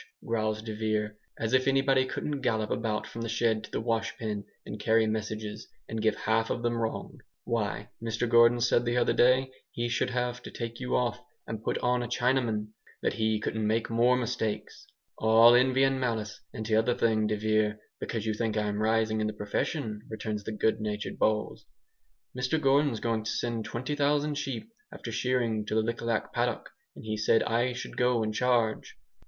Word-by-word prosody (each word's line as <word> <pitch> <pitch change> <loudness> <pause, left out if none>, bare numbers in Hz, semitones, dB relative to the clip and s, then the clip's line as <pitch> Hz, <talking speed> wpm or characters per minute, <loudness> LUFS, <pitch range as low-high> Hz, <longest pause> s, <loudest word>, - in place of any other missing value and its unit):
growls 110 -1 -1
de 110 -1 -5
Vere, 105 -1 -1 0.2
"as 115 +2 -2
if 130 0 +3
anybody 135 -1 +3
couldn't 145 +1 -3
gallop 110 -4 0
about 110 -2 -1
from 115 +2 -7
the 115 - -3
shed 110 -1 +1
to - - -9
the - - -2
washpen, 115 -2 -2 0.2
and 105 - -7
carry 110 +1 +3
messages, 110 0 -3 0.2
and 110 -1 -3
give 110 -1 +2
half 110 +1 0
of 120 - -2
them 120 0 +1
wrong! 115 -1 -3 0.2
Why, 105 -2 -2
Mr 115 +1 -1
Gordon 115 +1 +5
said 120 0 +3
the 120 0 0
other 120 - +3
day, 130 +1 +4 0.2
he 120 0 -2
should 120 - 0
have 125 0 -2
to - - -8
take 115 0 -6
you 125 -1 -1
off 120 -4 0 0.2
and 110 -2 -5
put - - 0
on 125 0 +2
a 120 - -3
Chinaman 120 -3 0 0.3
that - - +1
he 110 -1 +1
couldn't 110 0 -1
make 115 +1 0
more 120 +2 +4
mistakes." 115 -3 -3 0.3
"All 115 +2 +7
envy 130 +2 +4
and 135 0 +2
malice, 110 -5 -2
and 110 - -6
t'other 110 +2 +2
thing, 110 -2 +2
de 105 - 0
Vere, 110 0 +1 0.2
because 115 -2 -3
you 110 - 0
think 110 0 -1
I'm 105 0 -1
rising 110 0 +2
in 110 - +1
the 110 - -3
profession," 105 +2 -2
returns 110 -1 -4
the - - -3
good 110 0 +1
natured 105 -1 -4
Bowles, 110 0 0 0.7
"Mr 125 +5 0
Gordon's 140 -4 +3
going 115 -1 -1
to 110 - -3
send 115 -2 -2
20,000 145 +3 0
sheep, 135 - -4 0.2
after 115 - -7
shearing, 115 -2 0
to - - -1
the 110 - +3
Lik 115 +1 -3
Lak 115 -2 -1
paddock, - - -1 0.2
and - - -11
he 110 0 -2
said 105 +1 +3
I 120 +2 +1
should - - -7
go 125 -2 +2
in 110 - -1
charge." 120 -2 +1
115 Hz, 190 wpm, -29 LUFS, 110-125 Hz, 0.7 s, All